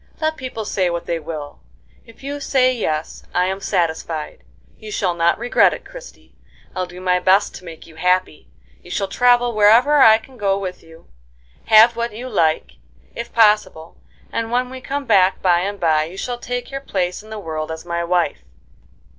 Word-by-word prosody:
Let 315 Hz, 0 st, 0 dB
people 255 Hz, -6 st, -6 dB
say 190 Hz, -3 st, 0 dB
what 170 Hz, 0 st, -4 dB
they 170 Hz, -, -2 dB
will, 150 Hz, -, -7 dB, 0.5 s
if 230 Hz, +3 st, -17 dB
you 285 Hz, +1 st, -5 dB
say 255 Hz, -2 st, +2 dB
yes 155 Hz, -10 st, -3 dB
I 180 Hz, -, +3 dB
am 190 Hz, +1 st, -2 dB
satisfied. 160 Hz, -3 st, -2 dB, 0.4 s
You 215 Hz, -1 st, -9 dB
shall 185 Hz, -4 st, 0 dB
not 170 Hz, 0 st, +2 dB
regret 240 Hz, +2 st, +3 dB
it, -, -, -13 dB
Christie; -, -, -13 dB, 0.4 s
I'll 185 Hz, -1 st, -2 dB
do 180 Hz, 0 st, -11 dB
my 180 Hz, -1 st, +1 dB
best 190 Hz, +3 st, +3 dB
to -, -, -15 dB
make 165 Hz, -2 st, -11 dB
you 160 Hz, -1 st, -16 dB
happy; 180 Hz, -1 st, 0 dB, 0.3 s
you -, -, -15 dB
shall 195 Hz, +2 st, -2 dB
travel 245 Hz, +3 st, +3 dB
wherever 225 Hz, +8 st, +5 dB
I 220 Hz, -4 st, +8 dB
can 255 Hz, +3 st, -16 dB
go 195 Hz, -2 st, 0 dB
with 185 Hz, -2 st, -6 dB
you, 165 Hz, 0 st, -17 dB, 0.6 s
have 225 Hz, +2 st, +7 dB
what 235 Hz, -2 st, -3 dB
you 245 Hz, +3 st, -6 dB
like, 155 Hz, -, 0 dB, 0.4 s
if -, -, -7 dB
possible, 210 Hz, -7 st, +2 dB, 0.4 s
and 230 Hz, 0 st, -3 dB
when 250 Hz, +1 st, 0 dB
we 260 Hz, 0 st, -8 dB
come 280 Hz, +2 st, -4 dB
back 190 Hz, -5 st, +3 dB
by 175 Hz, -2 st, +3 dB
and 200 Hz, +2 st, -3 dB
by, 155 Hz, -3 st, +2 dB
you 175 Hz, +4 st, -10 dB
shall 245 Hz, +3 st, -4 dB
take 245 Hz, +1 st, -5 dB
your 275 Hz, 0 st, -5 dB
place 180 Hz, -8 st, -2 dB
in 215 Hz, -, -16 dB
the 220 Hz, -, -6 dB
world 160 Hz, -5 st, -5 dB
as 160 Hz, +1 st, -7 dB
my 170 Hz, 0 st, -2 dB
wife. 175 Hz, -, 0 dB
195 Hz, 190 wpm, -20 LUFS, 170-240 Hz, 0.6 s, I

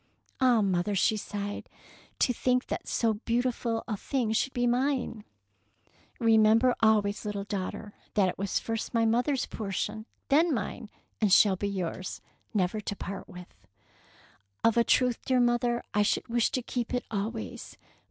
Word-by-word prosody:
" -, -, -34 dB
Ah, 245 Hz, -4 st, +5 dB
mother,'^ 195 Hz, +1 st, 0 dB
she 215 Hz, -, +3 dB
sighed, 205 Hz, -1 st, -5 dB, 0.5 s
to 250 Hz, -, +2 dB
think 250 Hz, +1 st, +1 dB
that -, -, -4 dB
so 225 Hz, -2 st, +1 dB
beautiful 235 Hz, +1 st, -1 dB
a 220 Hz, -, -1 dB
thing 240 Hz, +1 st, -1 dB
should 225 Hz, +4 st, +1 dB
be 245 Hz, -1 st, 0 dB
mine! 245 Hz, -2 st, 0 dB, 0.5 s
" -, -, -38 dB, 0.2 s
Remember 225 Hz, +1 st, +5 dB
always, 210 Hz, -2 st, +2 dB
little 205 Hz, -2 st, -3 dB
daughter, 200 Hz, +1 st, -5 dB, 0.2 s
that 200 Hz, -3 st, +4 dB
it 180 Hz, -, -2 dB
was 195 Hz, 0 st, -1 dB
first 225 Hz, +1 st, -3 dB
my 230 Hz, 0 st, +3 dB
mother's 245 Hz, +4 st, +1 dB
portion, 215 Hz, +1 st, -4 dB, 0.2 s
then 320 Hz, +5 st, +4 dB
mine, 220 Hz, +1 st, -5 dB, 0.3 s
and 210 Hz, -3 st, +3 dB
shall 195 Hz, +1 st, +6 dB
be 200 Hz, +2 st, -2 dB
yours, 185 Hz, -1 st, -4 dB, 0.3 s
never 205 Hz, 0 st, 0 dB
to 205 Hz, -, -4 dB
part 195 Hz, -1 st, -7 dB
with." 180 Hz, 0 st, -11 dB, 1.1 s
"Of 230 Hz, -, +4 dB
a 235 Hz, -, +5 dB
truth, 250 Hz, 0 st, +2 dB
dear 255 Hz, -1 st, +2 dB
mother, 240 Hz, 0 st, +2 dB
I 210 Hz, -, +3 dB
should 205 Hz, -, +1 dB
wish 235 Hz, -1 st, +2 dB
to 255 Hz, -, -1 dB
keep 245 Hz, +1 st, -3 dB
it 245 Hz, -, -2 dB
always. 220 Hz, +2 st, -4 dB
225 Hz, 160 wpm, -28 LUFS, 205-245 Hz, 1.1 s, shall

